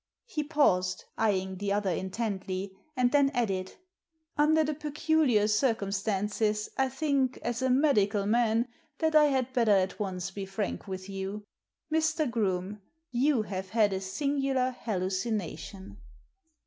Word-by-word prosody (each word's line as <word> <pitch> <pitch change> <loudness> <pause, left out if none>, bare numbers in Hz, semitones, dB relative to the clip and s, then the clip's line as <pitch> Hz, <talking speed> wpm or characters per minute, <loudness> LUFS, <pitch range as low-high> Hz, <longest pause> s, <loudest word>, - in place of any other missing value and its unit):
He 315 -11 -3
paused, 190 - +2
eyeing 190 -3 0
the 200 +1 -2
other 200 -2 +1
intently, 190 0 -3 0.2
and 250 -1 +3
then 280 -1 +4
added, 190 -6 -1 0.6
Under 310 +2 +4
the 305 0 -1
peculiar 300 -6 +2
circumstances 210 -1 0
I 265 0 +1
think, 270 -2 0
as 240 +1 -2
a 260 - +1
medical 215 -7 +3
man, 230 +2 +2 0.3
that 320 +1 +1
I 305 -1 +8
had 260 -3 0
better 235 -4 +2
at 190 +1 +1
once 185 -3 -3
be 195 -1 -6
frank 195 +1 -3
with 190 0 -6
you. 195 +1 -5 0.5
Mr. 315 -1 +2
Groome, 205 -3 -1 0.3
you 250 -1 +2
have 190 -2 -5
had 215 -2 +3
a 190 - -2
singular 270 +3 0
hallucination. 190 -3 -3
215 Hz, 135 wpm, -29 LUFS, 195-270 Hz, 0.6 s, I